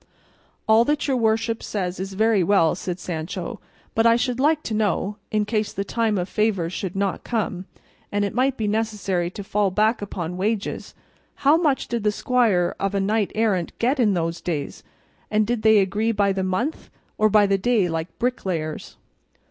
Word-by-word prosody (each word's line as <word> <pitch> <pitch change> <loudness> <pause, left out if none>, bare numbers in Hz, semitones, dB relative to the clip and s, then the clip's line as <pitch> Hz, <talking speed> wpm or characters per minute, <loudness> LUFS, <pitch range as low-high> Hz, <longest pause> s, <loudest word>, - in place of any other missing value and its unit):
"All 220 +1 +6
that 295 +2 0
your 270 - +1
worship 225 -1 +1
says 185 -3 -3
is 190 +1 -4
very 215 -1 +3
well," 165 -3 +3
said 180 0 -5
Sancho, 175 +1 -5 0.3
"but 225 - +2
I 230 0 +5
should 245 +1 -1
like 305 +2 +2
to 225 - -4
know 210 -1 0
(in 215 -1 0
case 215 0 -1
the 200 - -3
time 220 0 0
of 180 0 -1
favours 195 -6 0
should 185 -2 -4
not 195 -1 -1
come, 200 -5 -2 0.5
and 205 0 +1
it 200 - -3
might 260 +1 +1
be 215 - -1
necessary 205 -5 -1
to 200 +3 -8
fall 205 0 +1
back 215 +4 +1
upon 180 -3 -4
wages) 205 +2 -2 0.5
how 290 +3 +7
much 310 -5 +1
did 235 -2 -2
the 210 - +3
squire 210 -7 +1
of 195 0 -1
a - - +2
knight 205 +1 0
errant 210 -6 0
get 260 +4 +1
in 210 -5 +3
those 165 0 -2
days, 150 -5 -4 0.5
and 215 0 +2
did 235 0 -1
they 220 0 +5
agree 205 +3 +1
by 200 -2 +2
the 190 - -2
month, 210 +12 -2 0.3
or 215 0 +4
by 210 0 +5
the 195 0 +1
day 215 -2 +2
like 165 0 -4
bricklayers?" 185 -11 -3
210 Hz, 190 wpm, -23 LUFS, 185-225 Hz, 0.5 s, how